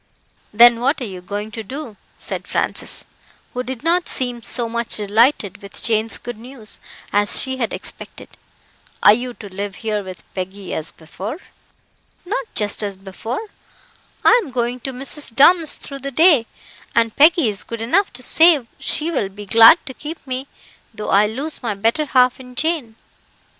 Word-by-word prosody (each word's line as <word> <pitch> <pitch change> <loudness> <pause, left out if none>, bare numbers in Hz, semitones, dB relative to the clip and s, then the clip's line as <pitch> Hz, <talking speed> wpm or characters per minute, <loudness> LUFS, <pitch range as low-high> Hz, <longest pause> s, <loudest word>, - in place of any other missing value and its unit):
"Then 235 +2 +7
what 275 +5 +1
are - - -4
YOU 185 -4 -8
going 205 +3 -5
to 225 - -6
do?" 255 +1 -8 0.2
said - - -6
Francis, - - -1 0.5
who 250 - -2
did 255 0 -6
not 345 +2 +2
seem 245 -2 -2
so 235 +3 -3
much 235 0 -1
delighted 215 0 +2
with 200 - -9
Jane's 220 0 +1
good 240 -2 -8
news 240 -2 -8 0.3
as 205 0 +2
she 260 -1 0
had 235 -4 -2
expected. - - -7 0.7
"Are 205 - +9
you 245 +2 -3
to 205 - -10
live 200 0 -4
here 215 -1 -2
with 185 -2 -10
Peggy, 190 +1 -6
as 160 - -4
before?" 195 - -7 0.9
"Not 445 +6 -3
just 210 0 0
as 200 -2 -3
before. 220 - -6 0.8
I 475 - +6
am 305 - -9
going 245 0 -2
to 265 - -4
Mrs. 270 -1 -3
Dunn's 325 +3 +6
through 275 -1 -7
the 275 +1 -5
day, 295 -4 +4 0.5
and 230 -1 +2
Peggy 320 - +5
is 200 -2 -3
good 230 - -7
enough 335 - +1
to 255 - -7
say 320 -4 +5
she 320 +2 0
will 210 -11 -1
be 205 +1 -10
glad 230 - +7
to 265 - -7
keep 300 +5 -8
me, 260 0 -4 0.4
though 215 -2 -6
I 205 +2 +4
lose 275 +9 -5
my 230 -5 -2
better 225 +10 +1
half 255 -2 +3
in 250 -1 -12
Jane. 295 -6 -1
240 Hz, 175 wpm, -20 LUFS, 210-275 Hz, 0.9 s, Are